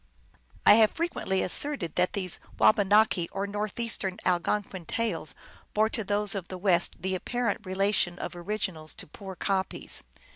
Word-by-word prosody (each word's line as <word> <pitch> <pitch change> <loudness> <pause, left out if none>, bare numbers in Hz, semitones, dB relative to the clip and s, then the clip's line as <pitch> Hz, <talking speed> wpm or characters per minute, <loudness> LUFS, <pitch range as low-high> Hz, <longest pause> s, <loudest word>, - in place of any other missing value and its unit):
I - - +10
have 215 - +6
frequently 320 - -1
asserted 205 - +1
that 180 0 +1
these 185 -4 0 0.2
Wabanaki 205 -4 +4
or 195 +1 -2
Northeastern 205 -1 -3
Algonquin 185 0 -1
tales 190 -10 -2 0.4
bore 215 +1 +3
to 225 -1 -3
those 205 0 +1
of 190 -4 -4
the 185 - -6
West 180 -2 +2
the 190 0 -1
apparent 235 +4 -2
relation 190 -2 +1
of - - -6
originals 175 -4 -3
to - - -8
poor 190 +4 -9
copies. 190 +1 -1
195 Hz, 145 wpm, -28 LUFS, 180-210 Hz, 0.4 s, I